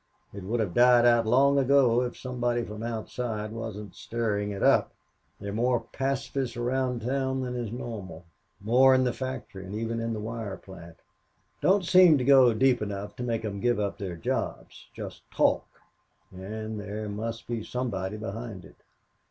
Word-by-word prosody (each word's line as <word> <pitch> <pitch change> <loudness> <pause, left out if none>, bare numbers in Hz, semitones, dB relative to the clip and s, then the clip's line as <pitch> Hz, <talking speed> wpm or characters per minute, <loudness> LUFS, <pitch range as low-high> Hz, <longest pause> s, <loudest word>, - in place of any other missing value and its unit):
It 100 - -7
would 115 +5 -1
have 95 -6 -2
died 120 0 +6
out 120 -2 +4
long 140 +4 +4
ago 130 -3 +4
if 125 -1 -3
somebody 120 -2 -1
from 105 -1 -7
outside 115 -1 -4
wasn't 110 -3 -6
stirring 105 -3 -2
it 100 -1 -4
up. - - +4 0.5
There 100 - -5
are - - -6
more 120 +2 +1
pacifists 135 -2 -2
around 125 -1 -1
town 130 +1 -1
than 125 -1 -4
is 120 -3 -3
normal, 105 -8 -7 0.3
more 130 +6 +5
in 130 - +3
the 125 -1 0
factory 130 -7 -6
and 95 +3 -7
even 115 +1 -2
in 115 0 -2
the 110 - -4
wire 110 -2 -5
plant. 85 -3 -13 0.6
Don't 190 0 +3
seem 180 -3 +7
to 130 - -1
go 130 -2 +7
deep 130 +1 +3
enough 100 -1 -5
to 125 - -4
make 115 -2 -2
'em 100 -2 -4
give 120 0 +1
up 100 -1 -2
their 95 -4 -4
jobs - - -4
just - - -8
talk, - - +2 0.6
and 110 +3 -6
there 105 +1 -5
must 115 +3 -5
be 115 -2 -3
somebody 105 -6 -3
behind 110 -2 -6
it. - - -17
115 Hz, 175 wpm, -27 LUFS, 105-125 Hz, 0.6 s, seem